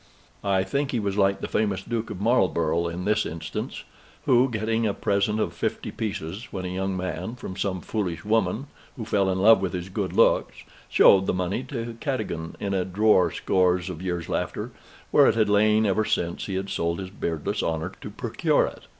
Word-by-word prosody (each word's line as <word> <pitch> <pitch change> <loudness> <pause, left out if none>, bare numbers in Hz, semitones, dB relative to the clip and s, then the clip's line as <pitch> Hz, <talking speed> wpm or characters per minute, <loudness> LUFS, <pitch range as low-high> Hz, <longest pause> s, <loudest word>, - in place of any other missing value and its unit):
I 95 -2 +2
think 140 +9 -1
he 120 - 0
was 100 -2 -2
like 100 -1 +2
the - - -3
famous 105 -3 0
Duke 115 -1 -3
of 90 - -6
Marlborough 85 -7 +2
in 85 +2 -4
this 105 +1 +2
instance, 80 -1 -5 0.4
who, 130 +1 +4
getting 110 0 0
a 100 - -1
present 100 +2 +1
of 85 - -1
fifty 80 - -3
pieces, 100 -1 -4
when 95 -1 -5
a - - -3
young 95 +1 -2
man, 95 +5 -4
from 95 -6 -7
some 95 -1 -2
foolish 90 -7 -3
woman 110 +3 +1 0.3
who 115 - -5
fell 100 -3 +1
in 95 - 0
love 110 +1 +6
with 95 -1 -2
his 90 0 -4
good - - -3
looks, - - +2 0.3
showed 95 -1 +6
the - - +1
money 90 +5 -1
to 115 -3 -5
Cadogan 110 - -3
in 100 -1 -2
a 95 -1 +1
drawer 95 0 +3
scores 90 -1 +1
of 85 -1 -8
years 90 -3 -3
after, - - -3 0.4
where - - +6
it - - +3
had 110 -2 +2
lain 105 +1 +4
ever 105 +2 +2
since 85 -4 -1
he 95 - -3
had 95 +1 -3
sold 85 -3 -1
his 95 -1 -6
beardless 80 -6 -2
honor 80 -1 -2
to - - -6
procure - - +1
it. - - -9
95 Hz, 200 wpm, -25 LUFS, 90-110 Hz, 0.4 s, love